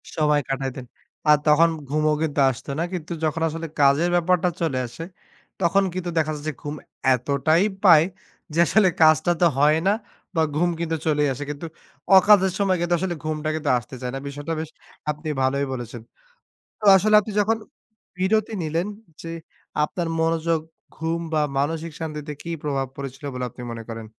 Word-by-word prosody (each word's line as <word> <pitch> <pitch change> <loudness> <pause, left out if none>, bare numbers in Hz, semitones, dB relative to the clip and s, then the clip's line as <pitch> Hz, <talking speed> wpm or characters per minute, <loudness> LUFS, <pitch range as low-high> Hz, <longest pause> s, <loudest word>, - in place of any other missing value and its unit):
সময় 150 -1 +2
কাটাইতেন। 135 -1 -3 0.4
আর 150 - +8
তখন 155 +3 +6 0.2
ঘুমও 155 +1 +2
কিন্তু 150 -2 -1
আসতো 130 +2 -6
না। - - +1
কিন্তু 175 -2 -5
যখন 155 +1 -1
আসলে 165 +1 -5
কাজের 145 +5 +4
ব্যাপারটা 180 +1 +2
চলে 160 -6 0
আসে 120 +7 -8 0.6
তখন 195 +3 +3
কিন্তু 180 -1 -3
দেখা 155 -1 +2
যাচ্ছে 150 +1 -4
ঘুম 145 0 -5 0.4
এতটাই 140 +7 +1 0.2
পায় 165 -5 +7 0.5
যে, 165 - 0
আসলে 215 +2 +4
কাজটা 155 +2 +5
তো - - +6
হয় 150 +2 +5
না - - +5 0.4
বা, 160 - +3
ঘুম 175 +3 +2
কিন্তু 165 -1 -1
চলেই 150 -1 +2
আসে। 145 - -6
কিন্তু 145 +3 -7 0.5
অকাজের 190 -1 +6
সময় 195 -2 +2
কিন্তু 175 0 0
আসলে 180 -1 -2
ঘুমটা 155 0 -2
কিন্তু 155 -2 -2
আসতে 120 +2 -8
চায় 125 -1 -3
না। - - -3
বিষয়টা 145 +3 -5
বেশ 160 -1 -5 0.4
আপনি 150 +1 -7
ভালোই 140 +2 +1
বলেছেন। 120 -2 -6 0.8
তো - - -18
আসলে 215 +3 +4
আপনি 215 - -7
যখন 220 +2 +2 0.6
বিরতি 215 +4 +1
নিলেন 165 +4 -1 0.3
যে, 165 - -7 0.5
আপনার 170 +3 -2
মনোযোগ, 165 0 +1 0.4
ঘুম 165 +1 -2
বা, 155 - +3 0.2
মানসিক 160 +3 -2
শান্তিতে 150 -2 -5
কি 170 - -8
প্রভাব 135 -3 -1
পড়েছিল 135 +1 -8
বলে 125 0 -3
আপনি 120 - -12
মনে 115 -1 -6
করেন? 115 -1 -6
155 Hz, 170 wpm, -23 LUFS, 145-170 Hz, 0.8 s, আর